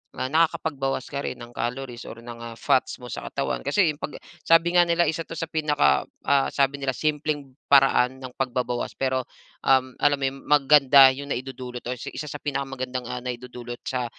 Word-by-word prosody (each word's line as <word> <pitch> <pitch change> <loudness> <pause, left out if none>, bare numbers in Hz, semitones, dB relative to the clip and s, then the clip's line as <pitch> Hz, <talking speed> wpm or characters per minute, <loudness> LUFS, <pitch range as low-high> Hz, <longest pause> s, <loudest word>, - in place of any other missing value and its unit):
nakakapagbawas 145 -2 0
ka 140 -1 -3
rin - - -2
ng 120 - -9
calories 120 -1 -4
or 115 - -8
ng 115 -1 -8
fats 130 - +1
mo 125 - -8
sa - - -6
katawan. - - -2
Kasi, 155 +2 +3
'pag 150 - -6 0.3
sabi 165 +1 +4
nga 175 - +7
nila, 170 0 +2
"Isa 165 +1 -3
ito - - -8
sa 165 0 -4
pinaka 150 - +2 0.2
ah," 140 -1 +3
sabi 140 0 +1
nila 135 -1 0
"...simpleng 150 -2 -2 0.2
paraan 135 -2 +5
ng 130 - -6
pagbabawas." 125 -2 -2
Pero, 130 -1 0 0.4
um, 130 -1 +3
alam 145 -1 +2
mo 135 - +2 0.3
maganda 140 -1 +7
yong 140 +2 -8
naidudulot 125 -1 -6
o 125 - -2
isa 150 +5 -6
sa 145 - -5
pinakamagandang 135 -3 -3 0.2
naidudulot 125 -1 -6
sa 125 -2 -2
135 Hz, 170 wpm, -25 LUFS, 125-145 Hz, 0.4 s, nga